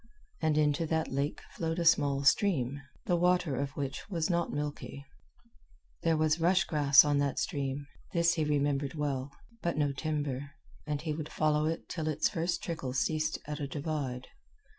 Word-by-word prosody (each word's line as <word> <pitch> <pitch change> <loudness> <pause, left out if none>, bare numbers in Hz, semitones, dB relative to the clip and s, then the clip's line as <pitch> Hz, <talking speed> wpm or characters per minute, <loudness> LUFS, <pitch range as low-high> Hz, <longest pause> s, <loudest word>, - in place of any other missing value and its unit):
And 155 -1 +2
into 150 +1 +2
that 160 0 0
lake 140 +3 -1
flowed 165 0 -2
a 170 - -1
small 140 -3 +4
stream, 140 - +2 0.2
the 175 - +2
water 175 -4 +2
of 140 +2 -1
which 140 +5 -4
was 170 -2 0
not 170 -1 0
milky. 145 -1 -5 1.0
There 165 -1 +2
was 155 +1 +2
rush 180 +3 +4
grass 145 -3 +6
on 145 -1 +2
that 140 -1 0
stream 140 0 -2 0.3
this 170 0 +3
he 160 - 0
remembered 145 -1 0
well 140 -3 -2 0.3
but 170 -2 -1
no 145 -2 +2
timber, 140 -1 -3 0.3
and 150 -1 -1
he 155 -2 -1
would 155 0 -5
follow 150 0 +2
it 165 +1 -3
till 160 -3 -3
its 155 0 +1
first 170 0 -2
trickle 160 -7 -3
ceased 155 +5 0
at 150 +1 -5
a 145 - -2
divide. 140 -3 -4
150 Hz, 170 wpm, -31 LUFS, 140-165 Hz, 1.0 s, grass